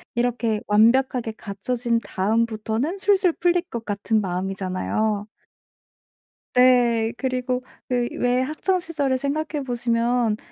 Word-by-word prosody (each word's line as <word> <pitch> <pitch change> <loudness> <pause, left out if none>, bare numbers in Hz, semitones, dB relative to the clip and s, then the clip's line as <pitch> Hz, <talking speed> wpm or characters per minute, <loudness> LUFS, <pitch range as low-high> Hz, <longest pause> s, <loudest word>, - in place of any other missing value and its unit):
이렇게 235 -3 0
완벽하게 230 +2 +3
갖춰진 230 +4 -2
다음부터는 225 - -1
술술 385 -3 +3
풀릴 350 +1 +2
것 230 -1 -5
같은 210 +2 0
마음이잖아요. 195 +3 -2 1.3
네. 240 -3 +4
그리고 255 -1 -2 0.2
그 245 -1 0
왜 245 +1 +2
학창 310 +7 0
시절을 290 -7 -1
생각해 290 +2 -2
보시면 235 -2 +1
240 Hz, 255 characters per minute, -23 LUFS, 220-260 Hz, 1.3 s, 네